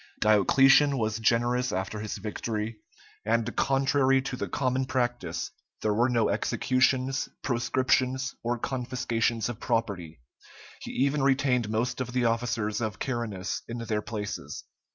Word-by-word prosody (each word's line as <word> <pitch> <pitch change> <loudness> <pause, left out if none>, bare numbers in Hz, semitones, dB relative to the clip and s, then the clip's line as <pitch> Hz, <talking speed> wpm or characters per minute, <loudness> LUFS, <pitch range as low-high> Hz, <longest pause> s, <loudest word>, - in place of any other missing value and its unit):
Diocletian 135 +7 +5
was 110 -1 -1
generous 120 +2 +2
after 95 +3 -3
his 105 0 -4
victory, 105 +1 -4 0.5
and, 115 +2 0
contrary 135 0 +3
to 130 - -4
the 125 - -4
common 130 -1 0
practice, 125 -2 -2 0.3
there 105 - +2
were 120 +4 +2
no 115 -3 +2
executions, 130 +1 +1
proscriptions, 130 +1 +1
or 120 +1 -1
confiscations 120 -3 -1
of 120 -2 -5
property; 100 - -2 0.6
he - - -8
even 140 +2 +1
retained 135 -4 +2
most 115 +4 -1
of 125 -1 -4
the 125 -1 +1
officers 115 -1 0
of 110 -4 -2
Carinus 115 -7 -3
in 115 - -5
their 110 -2 -2
places. 105 -2 -5
120 Hz, 130 wpm, -28 LUFS, 110-130 Hz, 0.6 s, Diocletian